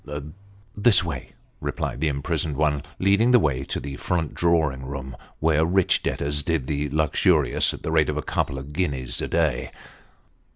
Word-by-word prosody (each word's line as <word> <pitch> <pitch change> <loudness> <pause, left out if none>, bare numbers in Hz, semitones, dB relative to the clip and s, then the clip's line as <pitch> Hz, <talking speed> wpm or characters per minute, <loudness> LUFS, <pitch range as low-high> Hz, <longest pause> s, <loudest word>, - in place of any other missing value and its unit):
" 100 - -26 0.3
This 105 -2 +5
way," 75 -7 -6 0.3
replied 65 - -4
the 80 - +2
imprisoned 75 0 -1
one, 75 -2 +1 0.2
leading 100 +5 +3
the 125 - +7
way 70 - 0
to - - -3
the 70 -1 -6
front 85 -4 -2
drawing 80 -6 +1
room, 65 -1 -6 0.2
where 80 0 +3
rich 90 +2 +2
debtors 75 +1 0
did 80 -3 -1
the 75 +1 -2
luxurious 75 +1 +2
at - - -9
the - - -2
rate 80 -1 +3
of 75 - -2
a 75 - -2
couple 70 - -1
of 70 +3 -8
guineas 70 -8 -1
a - - -2
day. 80 -7 0
75 Hz, 175 wpm, -24 LUFS, 70-85 Hz, 0.3 s, the